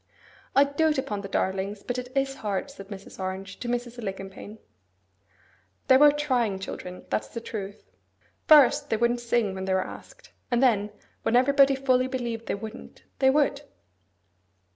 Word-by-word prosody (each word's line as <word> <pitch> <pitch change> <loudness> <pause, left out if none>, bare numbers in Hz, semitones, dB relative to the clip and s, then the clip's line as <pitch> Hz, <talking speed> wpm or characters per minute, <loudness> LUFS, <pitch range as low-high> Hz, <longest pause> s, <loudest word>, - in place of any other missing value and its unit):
'I 275 - +7
dote 300 +2 +1
upon 235 -7 -2
the 195 - -6
darlings; 195 +1 -2
but 245 0 -3
it 250 0 -8
is 270 0 +1
hard,' 205 +5 -3
said 195 -8 -11
Mrs. 195 -1 -10
Orange 190 +1 -5
to 245 - -5
Mrs. 240 0 -3
Alicumpaine. 195 0 -7 1.3
They 260 - +8
were 295 +1 +7
trying 255 -9 0
children, 180 -1 -7
that's - - -1
the 230 - -6
truth. 205 -3 -7 0.6
First, 290 -1 +6
they 220 - +1
wouldn't 240 +1 +1
sing 235 -4 0
when 190 0 -5
they 190 0 +1
were 190 - 0
asked; - - -12 0.2
and 240 +1 +2
then, 210 -5 +3 0.3
when 225 - +1
everybody 275 +2 +5
fully 260 -1 +2
believed 240 -3 -4
they - - -1
wouldn't, 220 +3 -10 0.2
they 265 - +5
would. 285 0 +2
240 Hz, 165 wpm, -26 LUFS, 200-265 Hz, 1.3 s, They